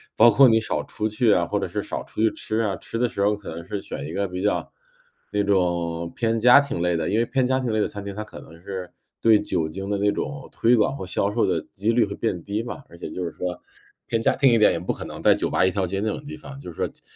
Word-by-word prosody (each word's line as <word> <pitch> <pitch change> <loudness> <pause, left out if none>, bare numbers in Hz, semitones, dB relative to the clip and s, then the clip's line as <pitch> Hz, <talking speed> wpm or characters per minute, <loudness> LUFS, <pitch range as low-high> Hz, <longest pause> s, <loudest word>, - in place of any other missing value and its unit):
包 115 +2 +7
括 130 +4 +7
你 115 -1 +4
少 - - -2
出 110 0 -3
去 110 +1 +2
啊， 85 -2 +2
或 - - 0
者 - - -2
是 - - -3
少 - - -5
出 - - -5
去 110 - +5
吃 110 - -3
啊， 105 -4 0
吃 115 - -6
的 125 - +3
时 115 - -4
候 105 +1 +3
可 105 - -10
能 85 +1 -7
是 100 +1 -4
选 70 - -6
一 80 - -7
个 100 +1 0
比 90 +1 -5
较， 105 - 0 0.6
那 105 - +1
种 85 -4 0
偏 115 -1 0
家 125 +4 +8
庭 140 -10 -4
类 90 0 +1
的， 80 -1 -1
因 105 - +1
为 115 - +3
偏 130 +1 +1
家 130 +1 +2
庭 125 -4 -2
类 110 - +1
的 - - +1
餐 100 -1 -7
厅， 100 - -5
它 105 +2 -5
可 105 - -11
能 85 +1 -14
是 95 -1 -5 0.3
对 110 -2 +5
酒 90 -6 -1
精 95 +5 -6
的 100 - 0
那 100 +1 +2
种 140 +5 -4
推 120 +2 +3
广 115 +4 +2
和 95 - -6
销 100 +2 -1
售 115 - +2
的 - - +1
几 105 +3 0
率 115 -1 +3
会 100 - -6
变 90 -7 -2
低 105 +2 -2
嘛， 120 +3 -7
而 - - -14
且 - - -6
就 90 - -4
是 85 - -4
说 90 +3 -4 0.5
偏 115 - 0
家 - - +2
庭 135 0 +5
一 115 - +5
点， 105 - +6
也 - - -1
不 90 - -2
可 - - -7
能 - - -8
在 - - +7
酒 - - -1
吧 - - +3
一 95 - +3
条 95 0 0
街 95 +2 -2
那 110 - -1
种 145 - -4
地 155 +1 -7
方， 140 -2 -10
就 140 - -9
是 - - -15
说 - - 0
减 - - -16
105 Hz, 325 characters per minute, -24 LUFS, 90-115 Hz, 0.6 s, 家